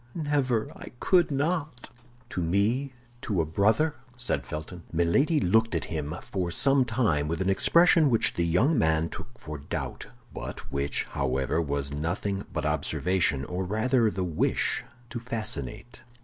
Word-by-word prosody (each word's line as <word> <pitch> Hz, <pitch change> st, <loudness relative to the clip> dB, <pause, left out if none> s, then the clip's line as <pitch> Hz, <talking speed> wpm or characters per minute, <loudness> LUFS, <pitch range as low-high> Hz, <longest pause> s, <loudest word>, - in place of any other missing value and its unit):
never!—I 145 Hz, -4 st, -1 dB
could 180 Hz, -3 st, +3 dB
not!" 145 Hz, -3 st, -2 dB, 0.4 s
"To 90 Hz, -, -2 dB
me, 105 Hz, +11 st, +1 dB, 0.3 s
to 100 Hz, -5 st, -1 dB
a 80 Hz, -, +2 dB
brother?" 105 Hz, -, +2 dB, 0.2 s
said 70 Hz, -, -1 dB
Felton. 80 Hz, +3 st, -6 dB
Milady 135 Hz, -, +2 dB
looked 110 Hz, -1 st, +2 dB
at 80 Hz, -, -1 dB
him 75 Hz, 0 st, -3 dB
for 90 Hz, -3 st, -3 dB
some 135 Hz, +8 st, +3 dB
time 110 Hz, -, +1 dB
with 80 Hz, +1 st, -2 dB
an 95 Hz, +1 st, +1 dB
expression 165 Hz, -, +5 dB
which 115 Hz, -3 st, +2 dB
the 85 Hz, -, 0 dB
young 110 Hz, -, +3 dB
man 80 Hz, -3 st, +2 dB
took 120 Hz, -, -9 dB
for 75 Hz, -2 st, -7 dB
doubt, 70 Hz, -, -5 dB, 0.3 s
but -, -, -7 dB
which, 70 Hz, -1 st, 0 dB
however, 65 Hz, +3 st, 0 dB
was 70 Hz, -2 st, -3 dB
nothing 95 Hz, +6 st, -2 dB
but -, -, -3 dB
observation, 85 Hz, -7 st, +1 dB
or 90 Hz, +4 st, -3 dB
rather 110 Hz, +4 st, +2 dB
the 95 Hz, -3 st, -3 dB
wish 85 Hz, -4 st, 0 dB, 0.3 s
to 120 Hz, -, -4 dB
fascinate. 110 Hz, -2 st, -5 dB
100 Hz, 150 wpm, -27 LUFS, 80-125 Hz, 0.4 s, expression